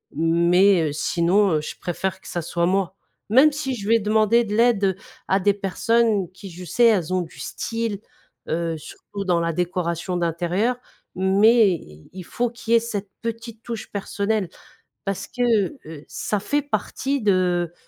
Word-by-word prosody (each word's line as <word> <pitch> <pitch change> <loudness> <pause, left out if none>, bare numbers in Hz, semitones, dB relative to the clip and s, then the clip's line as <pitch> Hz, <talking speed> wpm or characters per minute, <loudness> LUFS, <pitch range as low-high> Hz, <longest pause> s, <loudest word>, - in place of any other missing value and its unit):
Mais, 170 +2 +4
heu, - - -4
sinon, 175 +4 +2
heu, 150 - +1
je - - -6
préfère 190 +2 -3
que - - -14
ça 175 - -2
soit 170 +1 -1
moi. 190 +1 0 0.3
Même 265 +8 +6
si, 285 -3 -3
je 200 -4 -7
vais 230 0 +5
demander 220 +2 +3
de 210 - -3
l'aide, 230 -3 +3
heu, 190 -2 +1 0.3
à 190 +1 +2
des 205 +2 +3
personnes 205 0 +1
qui, 195 +1 -11
je 180 +1 -10
sais, 235 +8 +2
elles 185 -6 +3
ont 185 - +2
du 165 - -9
style, 225 -3 -3 0.5
heu, 165 0 -1
surtout 200 +5 -8
dans 175 -2 +2
la 165 0 0
décoration 175 +1 -2
d'intérieur. 175 +7 0 0.4
Mais, 200 +4 +5
i 75 - -8
il 185 -1 -7
faut 240 +5 -1
qu'il 235 -1 -3
y - - +8
ait - - +4
cette 210 -4 -5
petite 230 -1 -6
touche 230 -2 -6
personnelle. 200 0 -1 0.6
Parce 195 -2 -3
que, 250 - -6 0.5
heu, 155 -2 -10
ça 210 - -2
fait 290 +9 0
partie 280 -1 -2
de 180 -3 +1
195 Hz, 175 wpm, -23 LUFS, 175-225 Hz, 0.6 s, y